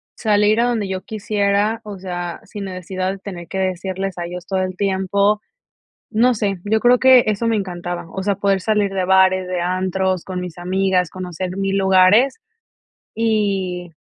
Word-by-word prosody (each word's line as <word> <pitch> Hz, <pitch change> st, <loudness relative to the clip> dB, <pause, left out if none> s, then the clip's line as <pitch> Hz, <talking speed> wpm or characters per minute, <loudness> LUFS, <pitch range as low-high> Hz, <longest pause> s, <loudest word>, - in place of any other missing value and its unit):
salir 210 Hz, 0 st, +2 dB
a -, -, +3 dB
donde 230 Hz, -4 st, 0 dB
yo 190 Hz, -1 st, -3 dB
quisiera, 210 Hz, +1 st, 0 dB
o 205 Hz, -2 st, -8 dB
sea, 175 Hz, -2 st, -5 dB
sin 205 Hz, -3 st, -7 dB
necesidad 185 Hz, 0 st, -3 dB
de 195 Hz, -, -7 dB
tener 180 Hz, -3 st, -8 dB
que 195 Hz, -, -4 dB
decirles 190 Hz, +1 st, -3 dB
a 175 Hz, -, -3 dB
ellos 175 Hz, 0 st, -7 dB
todo 190 Hz, -1 st, 0 dB
el 185 Hz, 0 st, -4 dB
tiempo, 200 Hz, +1 st, +1 dB, 0.7 s
no 240 Hz, +3 st, +3 dB
sé, 205 Hz, -3 st, -1 dB
yo 220 Hz, +1 st, +1 dB
creo 245 Hz, +2 st, +5 dB
que 260 Hz, -1 st, +7 dB
eso 215 Hz, +2 st, 0 dB
me 225 Hz, -, +2 dB
encantaba. 175 Hz, -3 st, -4 dB
O 190 Hz, -, -4 dB
sea, 200 Hz, 0 st, +1 dB
poder 195 Hz, 0 st, +1 dB
salir 205 Hz, 0 st, +1 dB
de 190 Hz, -1 st, 0 dB
bares, 190 Hz, 0 st, +4 dB
de 180 Hz, -1 st, -2 dB
antros 185 Hz, 0 st, -1 dB
con 185 Hz, -1 st, -4 dB
mis 180 Hz, -2 st, -7 dB
amigas, 185 Hz, 0 st, +1 dB
conocer 185 Hz, 0 st, -5 dB
mil 195 Hz, 0 st, 0 dB
lugares 195 Hz, -, +4 dB, 0.8 s
y, 195 Hz, -6 st, -1 dB
190 Hz, 175 wpm, -20 LUFS, 185-210 Hz, 0.8 s, que